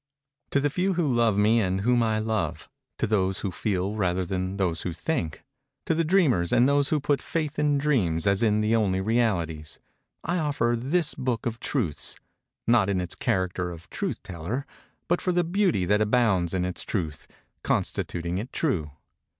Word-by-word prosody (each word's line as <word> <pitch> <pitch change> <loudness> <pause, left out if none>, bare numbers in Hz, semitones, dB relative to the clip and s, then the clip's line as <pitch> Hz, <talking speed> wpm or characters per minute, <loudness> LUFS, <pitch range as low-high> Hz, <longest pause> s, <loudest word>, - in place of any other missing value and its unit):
To 140 - +2
the 145 0 +1
few 185 +4 0
who 170 -3 +1
love 120 -5 +2
me 110 +3 +4
and 95 -1 0
whom 120 +3 +3
I 110 -1 +1
love—to 110 0 -3
those 95 -3 +1
who 100 - -2
feel 95 +1 -1
rather 95 -3 0
than 95 +1 -2
to - - -6
those 90 -4 0
who 90 - -3
think—to 135 - -4
the 165 +1 +1
dreamers 150 - +3
and 120 - +5
those 140 0 +2
who 155 - +2
put 145 0 0
faith 155 -2 -3
in 145 -1 +3
dreams 110 - +1
as 100 -1 +2
in 105 -2 +3
the 110 +2 +2
only 100 -4 +2
realities—I 95 - -2
offer 140 -6 +1
this 150 +7 +1
Book 125 -3 -2
of 115 -1 -2
Truths, 100 - -2 0.5
not 115 -4 +4
in 95 -2 +1
its 90 -1 -3
character 90 -1 -1
of 85 -1 -11
Truth - - -3
Teller, 95 - -4 0.4
but 175 - +1
for 180 - 0
the 175 0 +2
Beauty 175 - +1
that 105 +3 +2
abounds 105 -6 +2
in 90 -1 0
its 90 - -3
Truth; 80 -7 -3 0.3
constituting 85 +1 -1
it 120 +5 -6
true. 90 - -1
110 Hz, 175 wpm, -26 LUFS, 90-140 Hz, 0.5 s, and